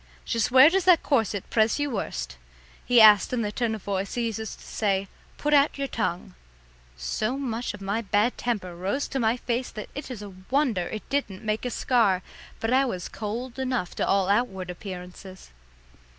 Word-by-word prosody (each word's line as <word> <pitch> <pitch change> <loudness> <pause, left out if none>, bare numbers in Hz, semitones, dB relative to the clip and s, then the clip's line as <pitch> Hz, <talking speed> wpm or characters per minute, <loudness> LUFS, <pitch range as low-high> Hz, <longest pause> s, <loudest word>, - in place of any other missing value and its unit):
"Just 230 -2 0
where 260 +5 +8
does 385 0 +1
that 360 -3 +6
corset 220 - 0
press 220 -1 +3
you 290 -1 -1
worst?" - - -4 0.5
he 245 -1 +4
asked 215 0 +7
in 235 -2 0
the 205 - -2
tone 225 0 -1
of 210 - -10
voice 195 -1 -3
he 240 -1 0
uses 220 -1 -4
to - - -17
say 195 -2 -1 0.3
"put 295 0 0
out 285 0 +4
your 275 0 -2
tongue." 190 -5 -3 0.6
So 215 - -2
much 240 -5 -3
of 205 - -14
my 200 +3 -1
bad 210 +3 +1
temper 200 -7 -3
rose 195 +11 -2
to 270 - -2
my 230 0 +2
face 245 +1 -2
that 215 - -8
it 285 -1 -7
is 230 -5 -6
a 200 -2 -9 0.2
wonder 255 - +1
it 215 - -7
didn't 220 -9 -2
make 215 +3 -1
a - - 0
scar; 220 -7 +2 0.4
but 225 +2 0
I 265 +1 +5
was 185 -9 -3
cold 235 +4 -5
enough 255 -8 -2
to - - 0
all 195 -1 +2
outward 195 -4 0
appearances. 180 - -9
220 Hz, 195 wpm, -26 LUFS, 195-250 Hz, 0.6 s, where